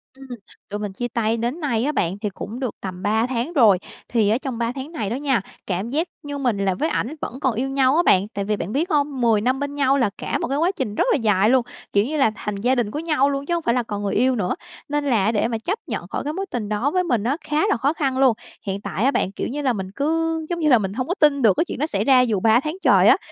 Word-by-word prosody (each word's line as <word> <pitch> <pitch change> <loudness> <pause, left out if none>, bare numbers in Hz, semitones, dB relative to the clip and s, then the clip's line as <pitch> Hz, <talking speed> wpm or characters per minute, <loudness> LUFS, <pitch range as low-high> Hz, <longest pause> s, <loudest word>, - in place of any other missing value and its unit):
Ừm, 270 0 -13 0.4
tụi 205 - -4
mình 205 -2 -4
chia 245 +5 -3
tay 230 -1 0
đến 240 +8 -2
nay 240 -7 0
á 290 - +1
bạn 190 - -1
thì 210 0 -2
cũng 220 +5 -7
được 255 -4 -3
tầm 185 -1 -6
3 220 +3 +2
tháng 255 +6 -2
rồi, 220 - +6 0.3
thì 220 -4 +2
ở 220 - +3
trong 260 -2 -5
3 235 0 -1
tháng 270 +3 -7
này 220 - -3
đó 235 - -2
nha, 265 -5 +1 0.3
cảm 190 +4 -2
giác 315 +6 0 0.2
như 285 -1 -5
mình 245 -6 0
là 195 -1 +1
với 300 - -1
ảnh 300 -1 -2
vẫn 255 - -5
còn 260 -5 +1
yêu 260 +4 -1
nhau 270 0 +3
á 345 - +4
bạn. 195 - +4
Tại 200 -1 -3
vì 210 - 0
bạn 195 - -4
biết 315 - 0
hông? 285 -4 0
10 225 -3 +3
năm 255 +4 +1
bên 285 0 -3
nhau 275 -1 +3
là 245 -7 +2
cả - - -2
một - - -2
cái 275 +2 -1
quá 335 +5 +2
trình 210 - -3
rất - - +2
là - - +4
dài 210 -2 +3
luôn, 255 -2 +3 0.3
kiểu 200 +1 +3
như 305 +4 -2
là, 245 -6 +3
thành 210 - -4
gia 245 +6 +1
đình 235 -4 -1
của 300 - -3
nhau 305 -4 +2
luôn, 275 0 -2
chứ 345 - -1
hổng 340 -2 -1
phải 235 - +2
là 250 0 +1
còn 205 -2 -5
người 200 - -1
yêu 255 0 +3
nữa, 185 -5 -1 0.3
nên 295 0 -1
là 225 -5 +2
để 215 0 +1
mà 230 -1 -2
chấp 370 - -3
nhận - - -4
khỏi - - -3
cái 295 - -3
mối 390 +4 -3
tình 220 -4 -3
đó 215 +7 0
với 365 +1 +1
mình 245 - 0
á, 265 +6 0
khá 300 +1 +1
là - - +2
khó 280 +5 +1
khăn 275 -5 -1
luôn. 265 -2 +5 0.3
Hiện 195 0 -3
tại 190 +3 -3
á 270 - +4
bạn, 190 - 0
kiểu - - -4
như 290 +4 -4
là, 265 -3 +1
mình 190 -4 -4
cứ 325 +3 0
giống 345 -1 -2
như 310 - +2
là 250 - +7
mình 195 -2 -3
hông 255 +4 -3
có 360 - 0
tin 290 -2 +4
được 220 -5 +5
cái 340 - +2
chuyện - - -6
đó 300 - +1
xảy 200 -8 -1
ra 255 +1 +5
dù 225 -6 +1
3 225 +4 +4
tháng 305 +5 -4
trời - - +5
á, - - +7
250 Hz, 305 wpm, -22 LUFS, 215-285 Hz, 0.4 s, là